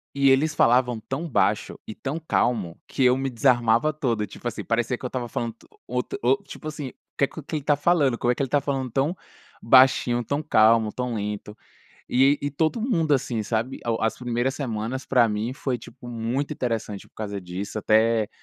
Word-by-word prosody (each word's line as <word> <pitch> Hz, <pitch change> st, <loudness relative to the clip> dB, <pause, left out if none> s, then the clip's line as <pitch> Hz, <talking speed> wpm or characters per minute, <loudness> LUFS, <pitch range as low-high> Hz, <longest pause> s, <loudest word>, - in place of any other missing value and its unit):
e 140 Hz, -1 st, +4 dB
eles 145 Hz, +4 st, +3 dB
falavam 125 Hz, 0 st, +3 dB
tão 135 Hz, +9 st, -5 dB
baixo -, -, +1 dB
e -, -, -7 dB
tão 140 Hz, +7 st, -4 dB
calmo 105 Hz, -, 0 dB
que 135 Hz, -, -1 dB
eu 125 Hz, 0 st, +5 dB
me 135 Hz, 0 st, -1 dB
desarmava 120 Hz, +2 st, +3 dB
todo. 125 Hz, -9 st, -1 dB
Tipo 105 Hz, +4 st, -8 dB
assim, 120 Hz, -, -4 dB
parecia 120 Hz, +1 st, 0 dB
que -, -, -19 dB
eu -, -, -1 dB
estava 125 Hz, -1 st, -4 dB
falando 115 Hz, 0 st, -3 dB
to -, -, -22 dB, 0.2 s
um -, -, -8 dB
outo 125 Hz, -, -2 dB
ou, 130 Hz, +3 st, +3 dB
tipo 155 Hz, -, -8 dB
assim: 150 Hz, -3 st, -6 dB
“O -, -, -17 dB, 0.2 s
que 140 Hz, -, +3 dB
que -, -, -10 dB
ele 155 Hz, -, 0 dB
está 145 Hz, +1 st, +2 dB
falando? 145 Hz, -5 st, +2 dB
Como 120 Hz, -, +1 dB
é 125 Hz, -, 0 dB
que -, -, -3 dB
ele 135 Hz, -, 0 dB
está 145 Hz, +2 st, +1 dB
falando 135 Hz, -2 st, -2 dB
tão 135 Hz, +7 st, 0 dB, 0.5 s
baixinho, 120 Hz, -1 st, +5 dB
tão 145 Hz, +4 st, -2 dB
calmo, 110 Hz, -5 st, +4 dB
tão 125 Hz, -1 st, -3 dB
lento?” 105 Hz, 0 st, -4 dB, 0.5 s
E 135 Hz, +3 st, +4 dB
e 145 Hz, -, -1 dB
todo 160 Hz, -, 0 dB
mundo 165 Hz, -, +2 dB
assim, 125 Hz, -4 st, -1 dB
sabe. 115 Hz, +4 st, -2 dB
A 120 Hz, -, 0 dB
o 115 Hz, -, -2 dB
as 110 Hz, 0 st, 0 dB
primeiras 120 Hz, +1 st, -1 dB
semanas, 130 Hz, 0 st, -3 dB
pra 125 Hz, -3 st, +4 dB
mim, 110 Hz, +3 st, -2 dB
foi 130 Hz, -2 st, -3 dB
tipo 120 Hz, +2 st, -12 dB
muito 120 Hz, +5 st, -2 dB
interessante 115 Hz, -7 st, -3 dB
por -, -, -50 dB
causa 100 Hz, -2 st, -5 dB
disso. 95 Hz, +4 st, -5 dB
Até 110 Hz, 0 st, +3 dB
125 Hz, 210 wpm, -24 LUFS, 115-135 Hz, 0.5 s, eu